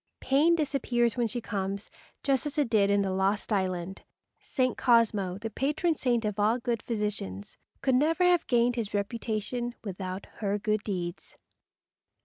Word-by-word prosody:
Pain 295 +6 +4
disappears 255 -7 +1
when 240 -2 +1
she 240 +3 -3
comes, 200 -2 -4 0.3
just 275 +1 +1
as 295 - -6
it 280 -6 +1
did 200 -3 +4
in 200 0 +3
the 190 - -1
lost 195 +3 0
island. 185 -1 -2 0.4
St. 255 -1 0
Cosmo, 215 -6 +3
the 225 +2 -5
patron 300 - +1
saint 240 -6 0
of 210 -1 -2
all 215 +3 +3
good 235 -1 -2
physicians, 210 - -3 0.3
could 265 - +3
never 310 +7 +3
have 355 -2 +3
gained 240 0 +2
his 210 -3 -2
reputation 230 +3 -2
without 190 -1 -5
her 205 -1 0
good 215 0 0
deeds. 180 -3 -5
225 Hz, 155 wpm, -28 LUFS, 200-250 Hz, 0.4 s, Pain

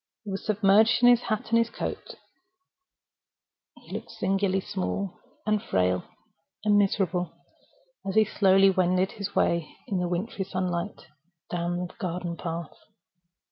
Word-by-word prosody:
He 205 - -6
was 195 - -4
submerged 215 +3 +4
in 245 - +9
his 245 -1 +6
hat 220 +1 -3
and 230 0 +3
coat; - - -5 1.6
he - - -13
looked - - -5
singularly 195 0 0
small, 195 -1 -3 0.3
and 215 -1 +1
frail, 90 -1 +1 0.6
and 210 -1 +4
miserable, 190 -3 +1 0.7
as 195 - -4
he 220 0 +6
slowly 195 -1 +5
wended 185 0 +2
his 200 -1 -6
way, 170 -2 +1
in 195 -3 -1
the 180 - 0
wintry 195 +3 -2
sunlight, 185 0 -3 0.5
down 175 0 -1
the 175 - -11
garden 175 -3 -3
walk. 165 -1 -4
195 Hz, 135 wpm, -27 LUFS, 175-205 Hz, 1.6 s, in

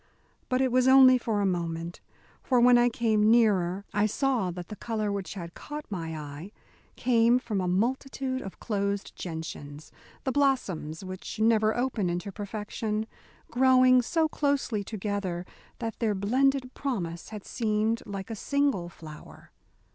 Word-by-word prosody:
But 255 0 +1
it 260 -1 +2
was 255 +1 +3
only 260 -1 +8
for 220 -3 -1
a - - +1
moment, 170 -2 -3 0.4
for 255 -2 +2
when 245 +1 +7
I 240 0 +5
came 220 -2 +2
nearer 200 -5 +3
I 210 +1 +2
saw 245 -4 0
that 175 -1 -7
the 210 - -6
colour 215 -2 -2
which 200 -1 -4
had 170 -3 -7
caught 300 0 -7
my 165 -4 -4
eye 150 +5 -8 0.4
came 235 -1 +3
from 215 -6 -2
a 180 - -1
multitude 260 +6 -1
of 195 - -9
closed 200 -2 -2
gentians 160 -3 -7 0.3
the 265 - 0
blossoms 200 - 0
which 185 +3 -7
never 220 0 +3
open 240 -7 0
into 175 +4 -3
perfection 210 +1 -4 0.5
growing 255 0 +5
so 320 +6 +1
closely 280 -8 0
together 200 -4 -3 0.3
that 225 -2 -5
their 220 -3 +1
blended 255 +6 +1
promise 175 -12 -4
had 210 -2 -8
seemed 220 0 0
like 195 +1 -6
a - - -3
single 275 -7 0
flower. 155 -3 -13
215 Hz, 150 wpm, -28 LUFS, 185-250 Hz, 0.5 s, only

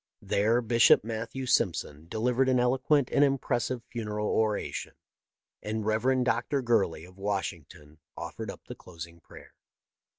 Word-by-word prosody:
There 115 +4 +2
Bishop 115 -1 +5
Matthew 115 +4 -4
Simpson 85 - 0
delivered 125 +6 +1
an 130 -1 +3
eloquent 130 +2 +2
and 145 - +4
impressive 130 -3 0
funeral 105 -2 -3
oration, 110 -2 -1 0.7
and 110 0 -3
Rev. 125 +4 +2
Dr. 125 +3 0
Gurley, 95 -9 +1
of 90 +2 -17
Washing 95 -5 -2
ton, 75 +1 -16 0.2
offered - - -6
up - - -8
the - - -7
closing 85 -1 -11
prayer. - - -15
115 Hz, 135 wpm, -29 LUFS, 100-125 Hz, 0.7 s, Bishop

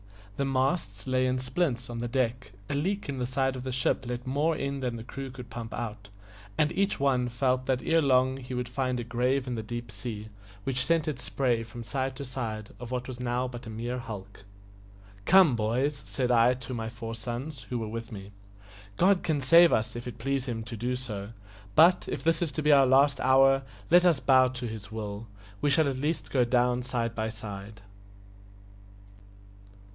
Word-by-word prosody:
The 140 - -1
masts 130 - 0
lay 130 0 +1
in 130 0 +1
splints 125 -2 -1
on 120 -1 -5
the 120 - -2
deck, 125 -2 -1
a - - -3
leak 190 +8 -1
in 140 -2 -4
the 125 - -1
side 130 +1 0
of 130 - -5
the 130 - -3
ship 130 0 0
let 125 0 -4
more 145 +5 +1
in 140 -1 -3
than 125 -3 -2
the 115 - -7
crew 135 +3 -6
could 125 -2 -10
pump 115 -2 -6
out, 105 -3 -6 0.5
and 150 0 +3
each 200 +2 0
one 130 -3 +2
felt 130 +1 0
that 130 -2 0
ere 165 0 +3
long 130 -2 +3
he 130 -1 -6
would 125 -1 -2
find 125 0 -1
a - - -2
grave 125 +3 0
in 125 - -3
the 115 - -2
deep 120 +1 -6
sea, 105 +1 -6 0.3
which 130 +1 0
sent 165 +1 +1
its 140 -5 -3
spray 125 -2 0
from 115 +1 -8
side 130 +2 -2
to 140 +1 -6
side 110 -5 -5
of 120 -1 -7
what 125 0 -3
was 125 -2 -7
now 125 +1 -1
but 120 -2 -8
a - - -5
mere 120 +3 -4
hulk. 100 -5 -8 0.8
"Come, 180 -8 +6
boys," 125 +6 0
said 125 -2 -1
I 120 +1 +5
to 125 0 -7
my 115 -2 -3
four 115 0 -6
sons, 120 +5 -6
who 125 - -1
were 110 -2 -3
with 115 +2 -6
me, 100 -2 -8 0.7
"God 190 0 +4
can 155 -3 0
save 165 +6 +7
us 110 +1 0
if 120 +1 -6
it 120 -2 -7
please 135 +2 -1
Him 115 -2 -3
so - - -8
to 115 -1 -7
do; 120 -4 -4 0.5
but, 175 +3 +6
if - - -4
this 165 0 +2
is 165 -4 0
to 155 - -3
be 150 - +4
our 135 -2 +6
last 135 +1 +4
hour, 135 +1 +5 0.3
let 175 +1 +7
us 165 -6 +3
bow 130 -1 +5
to 125 -1 -5
His 110 -2 -8
will 105 0 -5 0.3
we 145 - +2
shall 155 +1 +4
at 135 -2 -1
least 150 +5 -2
go 130 -3 +3
down 125 0 +2
side 120 -2 -2
by 110 -1 -2
side." 105 -2 -8
125 Hz, 210 wpm, -28 LUFS, 115-135 Hz, 0.8 s, save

